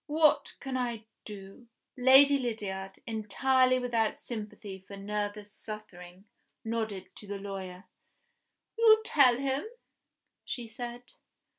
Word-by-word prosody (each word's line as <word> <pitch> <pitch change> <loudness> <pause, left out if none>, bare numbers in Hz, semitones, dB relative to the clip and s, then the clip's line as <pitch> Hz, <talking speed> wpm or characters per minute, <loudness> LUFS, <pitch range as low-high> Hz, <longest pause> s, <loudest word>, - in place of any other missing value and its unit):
What 305 0 +3
can 265 -1 -3
I 235 -3 -3 0.2
do?" 200 +3 -10 0.3
Lady 270 +2 +7
Lydiard, 200 -6 -4
entirely 255 +4 +2
without 235 -3 0
sympathy 210 -3 -7
for 200 - -9
nervous 205 +1 -4
suffering, 195 -4 -10 0.4
nodded 220 -4 -3
to 210 - -9
the 200 0 -4
lawyer. 190 -2 -7 1.0
"You 440 -1 +7
tell 275 - +5
him," 270 +1 -1 0.8
she 240 -2 -5
said. 240 +2 -7
225 Hz, 110 wpm, -30 LUFS, 200-255 Hz, 1.0 s, Lady